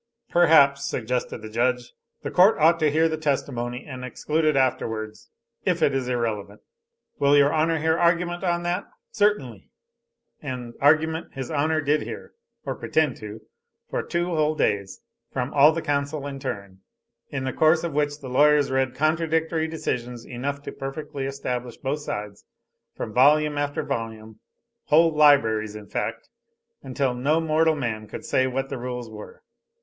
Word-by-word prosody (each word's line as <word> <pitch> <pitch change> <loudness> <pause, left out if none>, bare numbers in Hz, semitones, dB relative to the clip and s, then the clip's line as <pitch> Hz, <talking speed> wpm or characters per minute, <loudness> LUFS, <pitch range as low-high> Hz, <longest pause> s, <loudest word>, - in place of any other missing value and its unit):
"Perhaps," 150 -5 +5
suggested 125 -1 -3
the 110 - -7
judge, 120 +1 0 0.3
"the - - -4
court 185 +4 +5
ought 165 +2 +4
to 155 -2 +3
hear 160 +3 +3
the 160 -1 -3
testimony, 125 -4 -2
and 130 -4 -8
exclude 155 +5 -2
it 155 -2 +3
afterwards, 110 -5 -1 0.3
if - - +1
it 140 - +3
is 135 -2 -1
irrelevant." 110 -4 -3 0.6
"Will 140 +1 +4
your 145 0 +4
honor 160 +1 +2
hear 160 +1 +1
argument 175 +1 +1
on 175 -1 0
that!" 175 +3 -1 0.3
"Certainly." 175 - 0 0.7
And 125 -4 -6
argument 160 +3 +2
his 135 +1 -5
honor 155 +1 +1
did 150 +1 +1
hear, - - -8 0.3
or - - -2
pretend 155 -5 0
to, 105 +1 -9 0.5
for - - -1
two 170 0 -2
whole 155 -1 +1
days, 100 -8 -1 0.3
from 130 +1 -3
all 145 +2 +7
the 165 +1 -4
counsel 145 0 -2
in 140 -1 -6
turn, 100 -8 -6 0.5
in 135 -2 -4
the 130 - -2
course 160 +1 +3
of 170 -3 -3
which 145 0 -1
the 135 - -7
lawyers 145 +2 +4
read 130 -1 0
contradictory 160 +1 0
decisions 125 -7 -4
enough 140 +4 -4
to - - -6
perfectly 135 0 -6
establish 125 -3 -4
both 140 +3 -2
sides, 105 -8 -6 0.5
from 110 - -5
volume 150 +4 +4
after 145 +1 -2
volume, 110 -5 -5 0.5
whole 160 +2 +4
libraries 115 -8 +4
in 105 -1 -9
fact, - - -4 0.5
until 135 -1 -1
no 140 +6 +1
mortal 160 0 +2
man 110 -6 -3
could - - -8
say 130 0 +2
what 135 +1 -3
the 135 - -5
rules 125 -1 -5
were. 105 -1 -11
140 Hz, 160 wpm, -24 LUFS, 125-155 Hz, 0.7 s, all